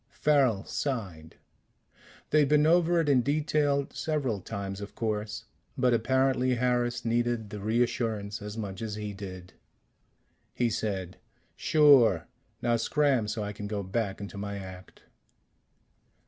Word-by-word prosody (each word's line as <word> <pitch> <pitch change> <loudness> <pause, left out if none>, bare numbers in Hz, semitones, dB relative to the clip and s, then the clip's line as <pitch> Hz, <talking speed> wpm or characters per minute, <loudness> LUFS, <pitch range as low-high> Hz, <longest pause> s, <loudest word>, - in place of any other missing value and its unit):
Farrel 135 -10 +2
sighed. 95 - -4 1.0
They'd 150 -2 +4
been 150 0 +4
over 170 +1 +4
it 155 - -2
in 135 -3 +4
detail 145 0 +1
several 140 -9 -2
times, 100 +1 -5
of 100 - -8
course, 110 0 -3 0.3
but 125 -2 +3
apparently 130 +2 +2
Harris 120 -1 0
needed 120 -2 0
the 105 - -6
reassurance 110 -1 -1
as 105 +1 -7
much 100 -3 -5
as 110 -2 -4
he 105 -1 -5
did. 95 -2 -9 1.0
He 120 -2 +1
said: 95 -4 -3 0.4
"Sure. 135 - +5 0.4
Now 120 -1 +2
scram 135 -1 +1
so 110 0 -3
I 105 0 -4
can 105 0 -6
go 100 -1 -3
back 100 +1 -2
into 100 0 -7
my 100 0 -4
act." 95 -1 -11
115 Hz, 135 wpm, -28 LUFS, 100-130 Hz, 1.0 s, Sure